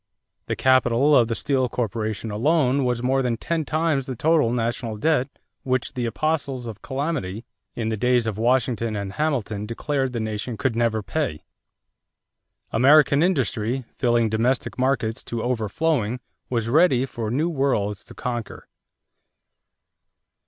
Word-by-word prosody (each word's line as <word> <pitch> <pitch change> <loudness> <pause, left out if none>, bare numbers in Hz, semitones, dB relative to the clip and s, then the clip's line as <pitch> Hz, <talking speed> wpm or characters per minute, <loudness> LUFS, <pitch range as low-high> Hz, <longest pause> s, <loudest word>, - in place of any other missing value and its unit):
The - - -1
capital 130 +2 +4
of 120 -4 +5
the 115 - -2
Steel 130 -1 0
Corporation 110 -2 -3
alone 135 +3 +2
was 125 -1 -1
more 135 +1 +2
than 120 -3 -1
ten 165 +4 -2
times 155 -4 0
the 130 - -4
total 150 -1 +2
national 115 -1 -2
debt 145 +2 +1 0.3
which 130 -1 -1
the 120 -2 -2
apostles 140 -1 -1
of 110 -4 -7
calamity 130 - -3 0.3
in 110 -1 -2
the 110 - -2
days 125 +1 +2
of 110 -2 -3
Washington 115 -2 +1
and 100 -1 -4
Hamilton 110 -9 -1
declared 135 +3 -1
the 120 - -3
nation 110 +1 -3
could 130 -5 0
never 115 -2 +1
pay. 100 - -2 1.3
American 140 +4 +5
industry, 130 - 0
filling 120 -2 +2
domestic 115 +4 0
markets 130 -3 0
to 115 -1 -4
overflowing, 125 +1 0 0.3
was 115 -3 -1
ready 135 -1 +4
for 115 -4 -5
new 145 +8 +1
worlds 130 - 0
to - - -12
conquer. 120 -2 -5
125 Hz, 140 wpm, -23 LUFS, 115-140 Hz, 1.3 s, of